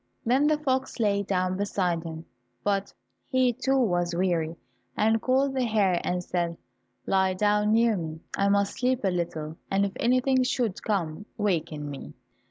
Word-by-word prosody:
Then 260 +5 +3
the 305 0 +3
fox 265 -4 -1
lay 200 -2 +2
down 185 -2 -1
beside 185 -4 0
him, 160 0 -7 0.4
but 200 -1 0 0.4
he 255 -2 +2
too 270 +4 0
was 175 -8 +1
weary, 170 -3 0 0.4
and 220 +1 +3
called 265 +1 +2
the 260 -1 0
hare 205 -6 +2
and 180 0 -1
said, 170 -1 -2 0.5
"Lie 190 -1 +2
down 210 +1 +2
near 230 0 +4
me, 160 -3 -5
I 200 0 +2
must 200 0 +1
sleep 255 -1 +1
a 190 - +2
little, 160 -3 -3
and 195 +1 +2
if 200 - -3
anything 255 +2 +3
should 245 -5 0
come, 195 -2 -2
waken 165 -8 -1
me." 140 -1 -8
200 Hz, 165 wpm, -27 LUFS, 175-235 Hz, 0.5 s, near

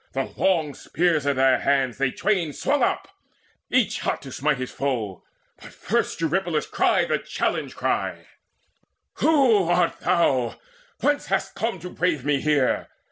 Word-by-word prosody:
The 135 0 -3
long 160 -6 +1
spears 160 -3 0
in 140 - +2
their 130 0 +4
hands 135 -3 +1
They 135 -2 +2
twain 175 0 0
swung 285 - 0
up, - - 0 0.6
each 245 -6 +2
hot - - -2
to 135 - -9
smite 140 +2 0
his 130 0 -5
foe. 115 -9 -3 0.4
But - - -13
first - - -1
Eurypylus 165 -1 0
cried - - +1
the - - +1
challenge - - -2
cry; - - -2 0.9
"Who 250 - +4
art 175 -1 +2
thou? 135 -9 +1 0.4
Whence 290 0 +1
hast 195 0 -1
come 225 -2 -2
to 180 +1 -7
brave 165 -7 -1
me 145 -2 +1
here? 150 -4 +1
155 Hz, 150 wpm, -24 LUFS, 135-190 Hz, 0.9 s, their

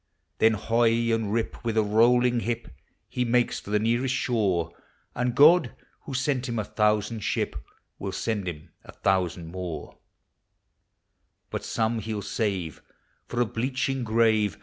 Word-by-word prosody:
Then 110 0 +5
hoy 115 +1 +2
and 110 -3 -1
rip, 115 +2 -2
with 115 -2 -1
a 110 - +4
rolling 120 +3 +4
hip, 115 -5 -3 0.4
He 125 - -1
makes 120 -2 0
lor - - -5
the - - +5
nearest 120 +4 +1
shore; 95 -11 0 0.4
And 125 0 -1
God, 155 -2 +6 0.3
who 135 - -5
sent 130 -1 0
him 115 - -2
a 110 - 0
thousand 105 +1 0
ship, - - -1 0.4
Will 100 - -4
send 105 -2 -2
him 80 -1 -7
a - - -13
thousand 90 -4 0
more; 90 -2 -6 1.5
But - - -4
some 115 0 -1
he'll 110 -1 -4
save 95 - -2 0.5
for 120 - -1
a - - +3
bleaching 130 +3 -2
grave. 110 -4 +2
115 Hz, 150 wpm, -26 LUFS, 105-120 Hz, 1.5 s, God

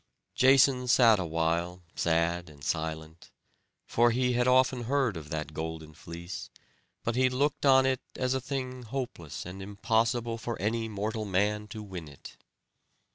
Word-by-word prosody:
Jason 130 -1 +5
sat 115 -4 +6
awhile, 85 +1 -1
sad 85 +1 0
and 70 -2 -15
silent; 80 +1 -4 0.6
for 120 +1 +3
he 125 +1 +1
had 120 +1 +2
often 130 -1 +3
heard 130 -4 +1
of 75 -2 -8
that 75 -1 -4
golden 80 0 -5
fleece; 85 +3 -8 0.5
but 115 - -1
he 130 0 +4
looked 140 +2 0
on 130 -1 +6
it 130 -1 +1
as 130 0 0
a 130 - -1
thing 130 -1 -4
hopeless 115 - -5
and 90 +2 -8
impossible 115 +3 0
for 115 0 -4
any 110 +3 -1
mortal 110 +1 -3
man 105 +2 0
to 105 +1 -7
win 90 -5 -7
it. 70 -2 -12
110 Hz, 150 wpm, -29 LUFS, 85-125 Hz, 0.6 s, sat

